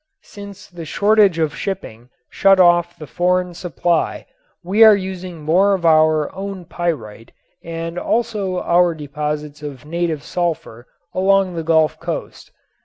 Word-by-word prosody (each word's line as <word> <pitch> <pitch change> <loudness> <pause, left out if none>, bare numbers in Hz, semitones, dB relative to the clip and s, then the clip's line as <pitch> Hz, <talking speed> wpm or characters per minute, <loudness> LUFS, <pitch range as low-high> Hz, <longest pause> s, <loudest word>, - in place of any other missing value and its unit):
Since 200 -1 -11
the 175 -2 -10
shortage 205 +2 +3
of 155 -2 -1
shipping 125 - -6 0.2
shut 195 -1 +4
off 175 -1 +3
the 155 - -9
foreign 180 +3 0
supply 175 -1 -2 0.4
we 200 +6 +4
are 220 -1 +8
using 185 -4 -6
more 190 +6 +3
of 175 -3 -5
our 155 -2 +3
own 195 -2 -6
pyrite 115 -12 -5 0.3
and 165 +1 -5
also 210 -6 -1
our 175 -1 +3
deposits 150 0 -5
of 145 -2 -8
native 165 -2 -2
sulfur 160 -9 -4 0.3
along 190 0 +2
the 165 - -3
Gulf 160 -2 +2
coast. - - -6
175 Hz, 135 wpm, -19 LUFS, 155-190 Hz, 0.4 s, are